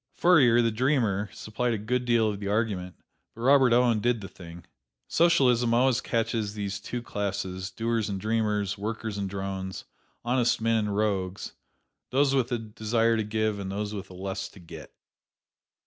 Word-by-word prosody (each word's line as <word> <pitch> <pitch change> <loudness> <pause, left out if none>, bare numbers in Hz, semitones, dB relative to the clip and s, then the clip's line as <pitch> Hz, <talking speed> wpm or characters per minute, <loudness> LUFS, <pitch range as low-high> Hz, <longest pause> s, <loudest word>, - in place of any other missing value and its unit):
Fourier, 130 -10 +5
the 115 - +2
dreamer, 110 -5 +1
supplied 115 +2 -2
a - - -2
good 125 +4 -1
deal 120 -2 +3
of 105 -2 -2
the 100 - -5
argument, 100 -4 -1 0.4
but 115 - -10
Robert 130 0 +5
Owen 120 -2 +4
did 120 +1 +1
the 95 - -7
thing. 85 -2 -12 0.4
Socialism 125 -8 +3
always 125 0 +3
catches 110 -2 -1
these 100 -1 -3
two 120 +4 -5
classes, 95 -3 -3
doers 115 0 -1
and 100 -1 -3
dreamers, 105 -2 -1
workers 110 0 -4
and 100 -1 -2
drones, 95 -1 -5 0.4
honest 120 0 +2
men 115 -1 +1
and 100 - -2
rogues, 100 -3 -1 0.6
those 135 +1 +2
with 130 -2 +1
a 120 - +1
desire 115 +1 0
to 110 - 0
give 110 0 -1
and 95 -1 -5
those 105 +1 -3
with 100 -2 -6
a 90 - -11
lust 95 +1 -5
to 100 - -14
get. 85 - -11
110 Hz, 170 wpm, -27 LUFS, 100-120 Hz, 0.6 s, Fourier